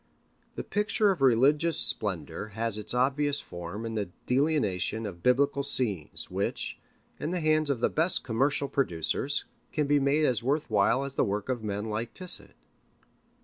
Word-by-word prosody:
The - - -4
picture 210 0 +2
of 185 - -3
Religious 140 +6 +4
Splendor 105 -1 -2
has 115 -1 0
its 105 +3 -3
obvious 140 +3 +2
form 90 +6 -7
in 115 - -4
the 105 -4 -2 0.2
delineation 125 - +1
of 90 -4 -7
Biblical 140 +5 +3
scenes, 120 - -2
which, - - -2 0.4
in 150 - -2
the 180 +1 -1
hands 155 -1 +2
of 130 -5 0
the - - +4
best 165 +3 +1
commercial 135 +4 +1
producers, 135 - 0 0.3
can 150 - 0
be 145 +1 +3
made 140 +3 +2
as 125 -6 +1
worth 140 +1 -1
while 110 +6 +3
as 140 - -6
the - - +2
work 105 +3 -2
of 125 -3 -1
men 105 0 -3
like 110 +2 -4
Tissot. 185 -1 -4
130 Hz, 165 wpm, -28 LUFS, 110-145 Hz, 0.4 s, Religious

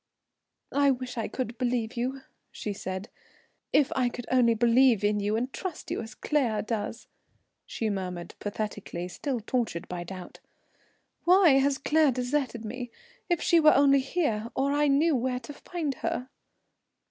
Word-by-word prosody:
"I 285 0 +4
wish 255 -1 -2
I 225 -2 -2
could 245 -2 -4
believe 245 -2 -1
you," 260 +3 -2 0.3
she 210 - -4
said. 190 +1 -5 0.6
"If 290 -2 +3
I 255 -2 +2
could 245 0 -7
only 240 -3 +4
believe 235 -1 +4
in 210 0 +2
you 205 +1 0
and 250 +3 -2
trust 370 -4 -6
you - - -1
as 220 -1 -9
Claire 240 -9 0
does," 220 0 -4 0.6
she 225 - -2
murmured 180 -4 -4
pathetically, 205 -4 -4
still 255 +7 -3
tortured 220 -7 -2
by 175 -1 -5
doubt. 185 0 -9 0.9
"Why 360 -1 +7
has 275 0 +2
Claire 305 +1 +3
deserted 250 -2 -2
me? 245 +3 -5 0.4
If 345 -2 +1
she 340 - +5
were 305 -1 +6
only 275 0 +5
here, 260 -6 -1
or 275 +1 +1
I 295 0 +3
knew 290 +3 +3
where 250 0 -1
to 290 - -9
find 310 -1 -4
her!" 250 0 -3
250 Hz, 160 wpm, -28 LUFS, 215-275 Hz, 0.9 s, Why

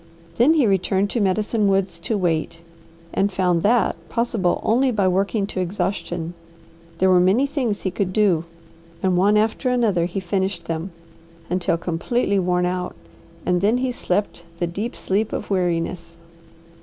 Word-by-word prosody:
Then 285 +7 +5
he 295 -6 +4
returned 195 0 +1
to 240 - -1
Medicine 205 +2 +1
Woods 195 -3 +1
to 210 +5 -2
wait, 165 -2 -1 0.5
and 200 +1 +1
found 180 -3 +1
that 230 +5 +3
possible 230 -6 0
only 255 +5 +3
by 205 -6 +1
working 195 +3 +1
to 195 - -5
exhaustion. 175 -2 -2 0.6
There 185 +2 +3
were 180 - +6
many 190 +9 +4
things 260 -7 -2
he 190 - -2
could 185 0 -1
do, 185 -5 +2 0.6
and 185 -1 +2
one 200 +4 +4
after 225 +4 +1
another 220 -9 +2
he 180 +3 -3
finished 190 -1 -2
them, 165 +3 -3 0.6
until 180 -2 +1
completely 195 +5 0
worn 180 -1 +1
out; 180 0 -2 0.5
and 180 -1 +1
then 215 +5 +3
he 255 0 -1
slept 200 -6 -2
the 175 - 0
deep 200 +8 -4
sleep 205 +3 -1
of - - -5
weariness. 170 -2 -1
190 Hz, 155 wpm, -22 LUFS, 180-215 Hz, 0.6 s, were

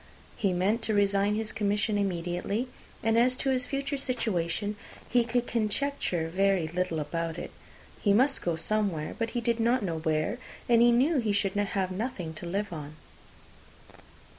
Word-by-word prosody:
He 195 - +1
meant 195 +6 +1
to 220 - +1
resign 200 0 +3
his 220 0 -2
commission 205 +1 0
immediately; 190 +4 -1 0.4
and 225 +1 +3
as 250 +1 +3
to 270 - 0
his 255 -1 0
future 275 0 -2
situation, 210 -6 -1 0.3
he 245 0 +3
could 240 +1 0
conjecture 215 - -1
very 190 -1 +2
little 175 -1 -1
about 165 +2 -3
it. - - -6 0.5
He 205 - +3
must 260 +7 +4
go 170 -2 0
somewhere, 175 -2 0
but 230 0 0
he - - 0
did 235 0 0
not 235 +1 +2
know 165 -4 -2
where, 160 +8 0 0.3
and 235 -1 +5
he 240 0 +7
knew 270 +6 +3
he 220 -4 0
should 200 -1 +1
have 195 -2 0
nothing 185 -5 -3
to 170 - -6
live 200 +2 -2
on. 150 -1 -7
205 Hz, 165 wpm, -29 LUFS, 175-235 Hz, 0.5 s, he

